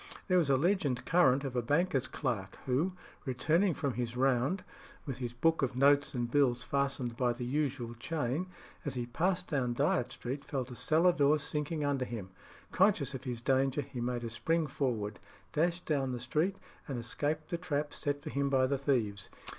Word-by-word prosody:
There 185 -2 +4
was 155 -5 +1
a 135 - +5
legend 145 -6 +1
current 140 -6 +4
of 135 -2 -4
a 125 - +2
banker's 145 +3 +1
clerk 95 -5 -3
who, 145 +9 +1 0.3
returning 160 +8 +2
from 140 -4 -1
his 120 0 -3
round, 135 +7 +2 0.4
with 135 -3 -5
his 120 -1 -4
book 165 +7 +2
of 130 -2 0
notes 140 +2 +4
and 120 -1 -2
bills 125 -3 +3
fastened 135 -2 -1
by 125 0 +1
the 120 +1 -5
usual 130 -3 -1
chain, 145 +5 -2 0.4
as 145 - -3
he 120 -1 -2
passed 180 +9 0
down 125 -6 0
Dyot 120 0 +1
Street 125 +3 -5
felt 130 -2 -3
a - - -7
cellar 160 +9 +4
door 150 -2 +4
sinking 150 +1 -2
under 140 -3 0
him. 105 -6 -6 0.4
Conscious 185 - +3
of 130 0 -6
his 120 -2 -4
danger, 135 +2 +2
he 130 -2 -6
made 120 0 -2
a 115 - -4
spring 165 +7 +1
forward, 115 -7 -2 0.3
dashed 170 +3 0
down 135 -4 0
the 125 - -3
street, 155 +10 0 0.3
and 135 - -3
escaped 145 +6 -2
the 170 -2 -2
trap 150 -4 -2
set 145 0 -2
for - - -5
him 140 0 0
by 130 -1 +4
the 135 +1 0
thieves. 115 -8 0
135 Hz, 190 wpm, -32 LUFS, 125-150 Hz, 0.4 s, a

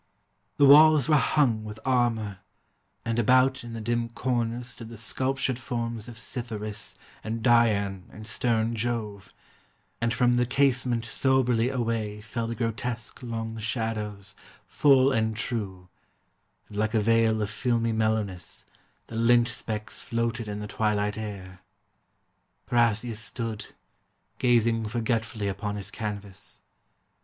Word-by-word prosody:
The 145 - +6
walls 150 -1 +8
were 155 - +5
hung 135 -6 +2
with 105 0 -8
armor, 115 -6 +1 0.7
and 115 0 0
about 130 +3 +4
In 120 -1 -8
the 115 - -5
dim 120 +1 -1
corners 120 0 -2
stood 115 -2 -8
the 115 - -9
sculptured 130 +3 -1
forms 115 -2 -4
Of 120 -2 -9
Cytheris, 110 -3 -4 0.3
and 110 +1 -4
Dian, 105 -6 +3
and 110 +2 -10
stern 115 0 +1
Jove, 110 -4 -3 0.7
And 115 0 +1
from 125 0 +3
the 125 0 +2
casement 125 -3 +2
soberly 125 -1 +2
away 115 -5 -2
Fell 115 +2 -4
the 115 - -3
grotesque 115 0 -4
long 115 -2 -4
shadows, 105 -3 -3 0.3
full 135 -2 +4
and 110 -3 0
true, 100 -7 -4 0.8
And 105 - -10
like 110 +2 0
a - - +4
veil 115 0 +3
of 105 -1 -2
filmy 115 +1 0
mellowness, 110 -5 -2 0.4
The 115 - -7
lint 120 +1 +4
specks 110 -2 -4
floated 115 -1 -2
in 105 0 -4
the 105 - -5
twilight 105 -1 0
air. 100 -4 -7 1.0
Parrhasius 115 -1 +1
stood, 115 -1 -4 0.7
gazing 115 -2 +2
forgetfully 110 -2 -1
Upon 105 +1 -3
his 100 -1 -6
canvas. 100 -4 -6
115 Hz, 130 wpm, -27 LUFS, 105-120 Hz, 1.0 s, walls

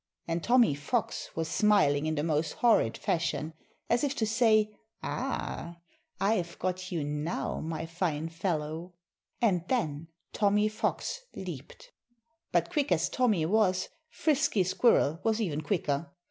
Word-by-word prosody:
And 165 0 -2
Tommy 240 - +5
Fox 145 0 -2
was 160 0 -1
smiling 160 -6 +3
in 155 - 0
the 145 - -1
most 160 0 0
horrid 225 - +3
fashion, 160 -2 -1 0.3
as 245 - +2
if 285 -1 0
to 225 - +1
say 215 -1 +3 0.3
"Ah! 175 -9 -3 0.4
I've 195 -4 0
got 185 +1 -3
you 165 -4 -1
now, 150 +3 -2
my 160 0 -4
fine 165 -2 -2
fellow!" 165 0 -3 0.5
And 180 -7 +3
then 160 - -1 0.3
Tommy 210 +1 +3
Fox 350 - -2
leaped. - - -8 0.6
But - - +1
quick 295 - 0
as 170 -1 +2
Tommy 215 -11 +2
was, 185 -1 +2 0.2
Frisky 285 - +2
Squirrel 185 - +3
was 225 0 +1
even 160 -9 -1
quicker. 150 -3 -1
180 Hz, 135 wpm, -29 LUFS, 160-220 Hz, 0.6 s, Tommy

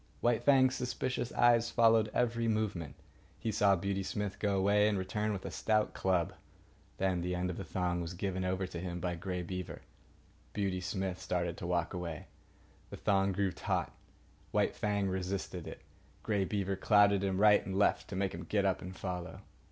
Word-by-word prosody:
White 120 -2 +2
Fang's 130 -2 +5
suspicious 125 -1 -2
eyes 120 -1 +4
followed 115 -2 +4
every 115 -1 +1
movement. 105 -9 -1 0.4
He 110 - -2
saw 100 -1 +4
Beauty 100 +2 -2
Smith 100 +1 -3
go 100 -2 +1
away 100 +2 +4
and 105 -2 +1
return 105 +3 -1
with 100 -2 -4
a - - -4
stout 110 -1 +1
club. 90 -3 0 0.6
Then 95 -2 +1
the 90 +1 -1
end 90 0 -1
of 85 - -7
the 95 - -4
thong 90 -1 -1
was 85 +1 -5
given 95 0 -2
over 95 +1 -1
to 90 -2 -6
him 90 0 -4
by 90 0 -2
Grey 90 +1 -4
Beaver. 90 0 -6 0.7
Beauty 95 -3 -1
Smith 95 -1 -3
started 85 -2 -1
to 85 - -5
walk 85 -1 0
away. 85 -4 -5 0.6
The - - -8
thong 100 -1 +2
grew 95 0 0
taut. - - -2 0.6
White - - +1
Fang 100 -2 0
resisted 95 -2 -3
it. - - -8 0.4
Grey 100 -3 +1
Beaver 100 -1 -1
clouted 100 0 +4
him 95 -1 0
right 105 0 +6
and 95 0 -4
left 100 - +2
to 100 - -6
make 95 0 -1
him 85 - -6
get 100 +3 +1
up 95 -1 +1
and 90 +1 -7
follow. 90 -3 -5
95 Hz, 185 wpm, -33 LUFS, 90-105 Hz, 0.7 s, right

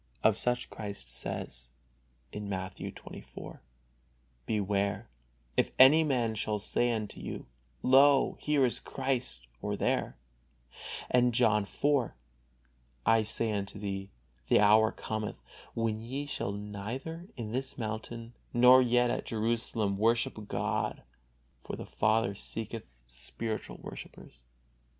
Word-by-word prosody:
Of 110 - +5
such 125 +2 0
Christ 100 - -6
says, - - -5 0.7
Matthew 95 -2 -4
xxiv: - - -10 0.9
"Beware, 100 - 0 0.5
if - - +3
any 145 +5 +8
man 125 -7 +1
shall 105 0 -1
say 120 +4 +1
unto 110 -3 -3
you, - - -6 0.4
Lo, 135 +2 +6
here 150 -3 +3
is 120 - 0
Christ, 130 - -2 0.2
or - - -2
there"; - - 0 0.9
and 125 -1 +4
John 105 -4 +4
iv: 145 -4 +1 0.9
"I 115 0 +5
say 110 +1 -1
unto 100 -1 -3
thee, 100 -1 -4 0.4
the - - +5
hour 110 +1 +6
cometh, 110 -1 -4 0.4
when 115 -1 0
ye 135 +5 -4
shall 120 -8 -2
neither 110 - -5
in 110 -3 -4
this 130 +2 -3
mountain 115 +1 -5 0.2
nor 125 +2 +8
yet 120 0 +3
at - - -3
Jerusalem 110 -2 0
worship 110 -1 +1
God, - - -1 0.6
for - - -5
the - - -7
Father 110 -1 +2
seeketh 110 +2 -5 0.2
spiritual 65 - -5
worshipers." - - -10
110 Hz, 120 wpm, -31 LUFS, 105-125 Hz, 0.9 s, any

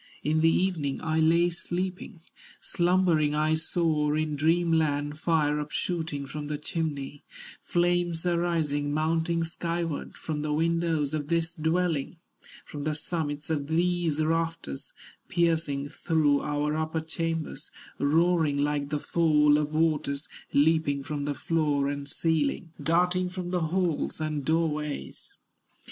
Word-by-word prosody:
In 155 +1 +2
the 165 - +5
evening 165 -6 0
I 160 0 +1
lay 170 +2 +4
sleeping, 180 0 -4 0.4
Slumbering 175 -4 +2
I 155 +1 +2
saw 160 -2 +1
in 155 -1 -1
dream 165 +3 +2
land 145 -2 0
Fire 150 -3 +2
upshooting 155 -2 -3
from 150 +1 -6
the 150 0 -2
chimney, 145 -2 -4 0.4
Flames 175 -1 +1
arising, 165 -5 0
mounting 165 +2 +1
skyward, 165 -1 -3
From 155 -2 -4
the 150 0 -1
windows 165 -2 +1
of 150 -2 -2
this 165 0 0
dwelling, 165 -1 0 0.5
From 145 -1 -7
the 155 0 -1
summits 150 -1 -3
of 145 -3 -1
these 170 -1 +1
rafters, 165 - -2 0.4
Piercing 160 -5 +1
through 150 -3 +2
our 150 0 -1
upper 160 +1 -1
chambers, 160 -2 -3 0.3
Roaring 160 0 +3
like 145 0 0
the 150 - 0
fall 150 -2 +3
of 150 0 -2
waters, 155 -2 0 0.2
Leaping 145 -1 +2
from 145 0 -3
the 145 0 -2
floor 150 -4 +1
and 140 0 -4
ceiling, 160 +1 0
Darting 180 +2 +2
from 180 -1 -5
the 175 -3 0
halls 175 -3 -1
and 155 -2 -2
doorways." 150 - -2
160 Hz, 130 wpm, -27 LUFS, 150-170 Hz, 0.5 s, the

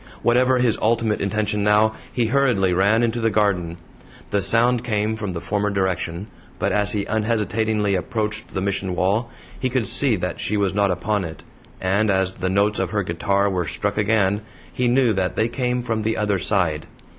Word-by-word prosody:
Whatever 125 +2 +3
his 120 -3 +1
ultimate 115 -1 +1
intention 105 +1 -1
now, 105 +1 +4 0.2
he 120 - 0
hurriedly 115 -7 +2
ran 100 +6 +3
into 120 0 0
the 115 - +2
garden. 95 -5 0 0.5
The 100 - +1
sound 115 +5 +3
came 110 -2 -1
from 105 -4 -4
the 85 - -4
former 105 +3 -1
direction, 95 -2 -2 0.3
but - - 0
as 105 0 0
he 100 -2 -1
unhesitatingly 110 -1 0
approached 105 +3 -3
the 95 - -1
Mission 95 -2 -2
wall, 100 +6 0 0.3
he 130 - 0
could 125 -2 0
see 130 +3 +1
that 90 -2 -4
she 105 - -1
was 100 -2 +1
not 100 0 +2
upon 105 +2 -1
it, 80 -2 -8 0.4
and 100 +3 +1
as 95 -1 +1
the 95 0 -3
notes 100 +3 +1
of - - -1
her 105 -2 -1
guitar 100 +4 0
were 90 -4 -1
struck 100 +5 -2
again, 105 -1 +2 0.3
he 125 - 0
knew 125 -2 +3
that 95 -2 -1
they 110 - +1
came 125 0 -1
from 115 -2 -1
the 110 +1 -1
other 105 -3 0
side. 85 -6 0
105 Hz, 190 wpm, -22 LUFS, 95-115 Hz, 0.5 s, now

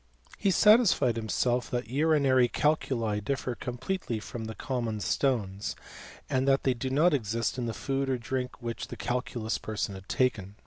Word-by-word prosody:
He 200 - +2
satisfied 190 - +5
himself 120 +2 0
that 120 -2 -2
urinary 140 -3 +4
calculi 120 -7 0
differ 130 +2 -2
completely 125 - -3
from 110 +1 -6
common 120 -5 -2
stones, 105 -5 -1 0.5
and 130 +1 0
that 135 0 +3
they 130 - +3
do 125 +2 -4
not 155 +6 +4
exist 115 -1 -1
in 120 - -2
the - - -1
food 135 +3 -2
or 130 - +1
drink 125 +2 -4
which 115 -1 -4
the - - -8
calculous 120 -2 -2
person 105 -2 -3
had 95 0 -11
taken. 105 -6 0
125 Hz, 155 wpm, -29 LUFS, 115-135 Hz, 0.5 s, satisfied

